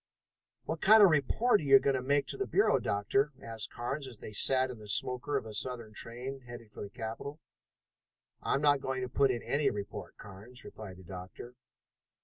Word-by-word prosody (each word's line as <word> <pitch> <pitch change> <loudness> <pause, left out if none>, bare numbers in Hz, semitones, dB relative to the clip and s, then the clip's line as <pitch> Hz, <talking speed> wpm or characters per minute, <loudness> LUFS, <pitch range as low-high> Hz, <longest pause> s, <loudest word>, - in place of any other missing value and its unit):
"What 160 0 -4
kind 215 +2 +8
of 195 - +8
a - - +2
report 205 - +3
are - - -6
you 135 -1 +8
going 135 0 +1
to 130 - -1
make 140 +2 +1
to - - -3
the 395 - -2
Bureau, 405 - +3
Doctor?" 135 +9 0
asked 115 -3 -6
Carnes 135 +4 -4
as 120 -4 -10
they - - -9
sat 130 +4 +3
in 120 - -10
the 105 - -11
smoker 125 +7 0
of 130 - -4
a 110 - -8
southern 115 0 -4
train, 125 +5 -5
headed 120 -3 -11
for - - -10
the 100 - -6
capital. 115 +7 -6 1.0
"I'm 140 - 0
not 145 -2 +4
going 130 -1 -2
to - - -2
put 135 +2 +3
in 120 -2 -2
any 145 +1 +1
report, 100 -1 -7
Carnes," 105 +5 -12
replied 95 -4 -10
the 95 - -13
doctor. 95 +6 -9
125 Hz, 205 wpm, -31 LUFS, 110-140 Hz, 1.0 s, kind